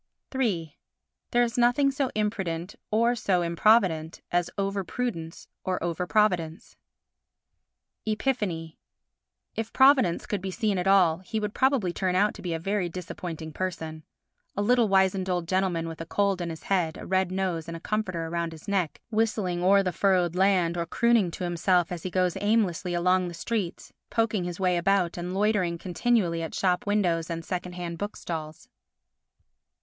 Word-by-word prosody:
iii 180 - -1 0.5
There 240 -1 +3
is 240 +1 -1
nothing 245 +4 +4
so 275 -1 -1
imprudent 195 -4 -2 0.2
or 230 +3 +3
so 195 -6 +1
improvident 170 -2 +2
as 175 0 +1
over 195 0 -1
prudence 170 -7 -4 0.2
or 185 -1 -1
over 175 +1 -2
providence. 180 -7 0 1.3
Epiphany 210 -9 -2 0.8
If 225 0 -3
Providence 265 -9 +4
could 205 -3 -2
be 190 - -4
seen 205 -1 0
at 180 - -1
all, 185 -4 +5
he 205 +4 -4
would 210 0 -3
probably 260 -10 +2
turn 185 -1 0
out 205 +3 +3
to - - -11
be 175 - -4
a - - -3
very 195 +1 -1
disappointing 165 -2 -6
person—a 160 -3 -4 0.6
little 235 +2 +3
wizened 190 -1 +2
old 175 -2 -1
gentleman 185 -3 0
with 165 0 -7
a 165 - -6
cold 200 0 +1
in 170 - -3
his 160 -1 -7
head, 175 -5 0
a - - -8
red 190 -1 +1
nose 185 -4 -2
and 165 0 -5
a - - -10
comforter 185 -4 -2
round 170 0 -2
his 155 - -13
neck, 190 -6 -1
whistling 215 -5 0
o'er 195 +2 +5
the 185 - 0
furrow'd 180 -2 +2
land 180 -3 +3
or 170 - -2
crooning 235 0 +3
to 170 - -6
himself 175 0 +1
as 175 -2 -4
he 185 - -4
goes 180 -1 +1
aimlessly 195 -5 +1
along 180 +1 +2
the 170 - -7
streets, 195 0 -3 0.2
poking 220 -5 0
his 175 0 -5
way 180 -2 +2
about 180 0 +2
and 180 +1 -4
loitering 195 -4 +1
continually 180 -1 0
at 165 - -5
shop 180 0 +1
windows 175 -6 +1
and 165 -1 -4
second 180 -1 -4
hand 170 -2 -5
book 205 +1 -4
stalls. 155 -2 -6
185 Hz, 170 wpm, -27 LUFS, 170-210 Hz, 1.3 s, all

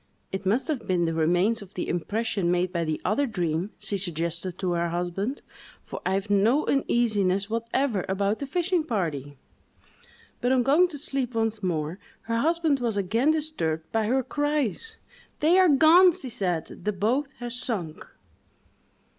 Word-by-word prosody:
—"It 190 0 -4
must 230 - +1
have 255 -10 -3
been 180 -3 +1
the 165 - -1
remains 175 +8 +2
of 200 0 -13
the 180 - -3
impression 200 +1 -1
made 180 +1 +1
by 170 -1 0
the 155 -1 -2
other 275 +7 +1
dream," 175 -3 -2
she 200 - -2
suggested 170 0 -2
to 185 -2 -1
her 170 0 0
husband, 180 +9 -3 0.4
"for - - -7
I 190 - +1
have 195 +2 -2
no 210 +8 +3
uneasiness 210 -7 +1
whatever 230 -2 0
about 200 +2 0
the 280 - -4
fishing 355 +2 0
party." 155 - -3 1.0
But 245 +2 +1
on 255 -2 +3
going 300 +8 +4
to 320 -4 -8
sleep 270 -4 -3
once 225 -1 0
more, 170 -1 -2 0.2
her 230 0 -2
husband 320 +1 +2
was 230 -4 -1
again 225 +9 +1
disturbed 295 - -1
by 220 -1 +1
her 260 +3 +1
cries: 295 - -2 0.4
"They 335 +5 +4
are 370 -2 +6
gone!" 330 +5 +7
she 325 -7 -7
said, 180 -7 -3
"the 210 - 0
boat 235 +9 0
has 240 0 -4
sunk!" 195 -11 -2
215 Hz, 165 wpm, -26 LUFS, 180-270 Hz, 1.0 s, gone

